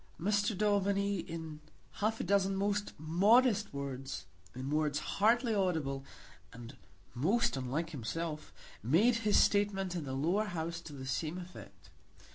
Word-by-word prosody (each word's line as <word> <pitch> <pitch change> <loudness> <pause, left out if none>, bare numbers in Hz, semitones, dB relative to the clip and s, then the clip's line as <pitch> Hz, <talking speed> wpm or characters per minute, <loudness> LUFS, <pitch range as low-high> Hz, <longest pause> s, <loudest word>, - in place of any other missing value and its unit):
Mr. 205 +2 +1
Daubeny, 200 -1 +1
in 160 -2 -6 0.4
half 220 +2 +1
a - - -1
dozen 195 -1 +2
most 205 +1 -1
modest 205 - +3
words, 135 - -5 0.3
in 130 +2 -4
words 150 -1 +1
hardly 230 - +2
audible, 160 -9 0 0.5
and 120 +3 -10 0.4
most 225 - +2
unlike 140 +6 -2
himself, 155 +4 -4 0.3
made 195 - +4
his 215 -2 +2
statement 195 -3 +2
in 170 - -3
the 135 -2 -5
Lower 170 +11 +1
House 170 -3 -4
to 160 - -10
the 135 -2 -7
same 155 +6 -2
effect. 180 0 -11
175 Hz, 135 wpm, -33 LUFS, 150-205 Hz, 0.5 s, made